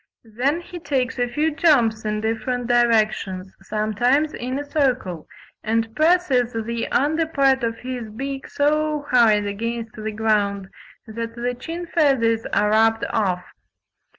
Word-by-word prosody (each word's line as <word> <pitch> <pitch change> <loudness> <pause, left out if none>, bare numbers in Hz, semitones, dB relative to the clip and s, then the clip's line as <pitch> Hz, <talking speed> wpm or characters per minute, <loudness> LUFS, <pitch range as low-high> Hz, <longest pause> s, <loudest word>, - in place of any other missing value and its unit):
Then 280 +8 +1
he 350 0 -9
takes 260 -5 -2
a 245 - +1
few 300 +6 0
jumps 240 -9 +2
in 210 0 -1
different 230 +3 -2
directions, 215 -6 +1
sometimes 225 +9 0
in 255 +2 -4
a 290 - -4
circle, 255 - -1 0.4
and 225 0 -1
presses 310 -7 +2
the 230 +1 -3
under 315 +4 +1
part 270 -4 +2
of 230 -1 -1
his 245 -3 -6
beak 270 +5 -5
so 300 0 0
hard 220 -4 +4
against 230 +2 -4
the 215 0 -5
ground 205 -3 0 0.4
that 230 +1 -6
the 245 +1 -2
chin 330 +8 -6
feathers 265 -9 +2
are 210 0 +2
rubbed 225 +1 +3
off. 185 -5 0
235 Hz, 140 wpm, -22 LUFS, 220-275 Hz, 0.4 s, hard